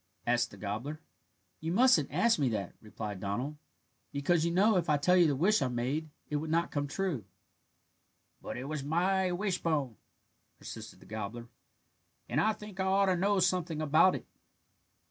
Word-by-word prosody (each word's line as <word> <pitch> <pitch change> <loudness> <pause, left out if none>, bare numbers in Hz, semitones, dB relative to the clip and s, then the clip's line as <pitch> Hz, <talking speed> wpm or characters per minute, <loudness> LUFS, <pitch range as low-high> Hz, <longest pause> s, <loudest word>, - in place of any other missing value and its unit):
asked 120 0 +2
the 100 - -13
gobbler. 110 +10 -4 0.6
"You 160 +1 -3
mustn't 255 +5 +4
ask 230 -6 +3
me 135 -3 +2
that," 100 -5 -3
replied 105 -2 -6
Donald, 120 +10 -3 0.5
"because, 155 +4 +1
you 170 - +2
know, 195 +5 +4
if 175 -2 +1
I 150 - +4
tell 180 +6 +3
you 175 -2 +6
the 145 - +1
wish 190 +8 +3
I 130 - +2
made 130 +6 -2 0.2
it 150 - -1
would 155 +2 -4
not 165 +2 +1
come 145 -1 -1
true." 160 - -2 1.2
"But - - -6
it 125 - -5
was 145 0 -4
my 180 +5 +1
wishbone," 165 - -1 0.6
persisted - - -9
the - - -15
gobbler, 110 +3 -6 0.8
"and 140 +5 +1
I 220 - +3
think 210 -2 -11
I 190 - +1
ought 195 +1 +3
to 190 -1 +2
know 200 +3 +2
something 180 -3 +1
about 155 +4 +4
it." - - -6
155 Hz, 175 wpm, -31 LUFS, 125-185 Hz, 1.2 s, you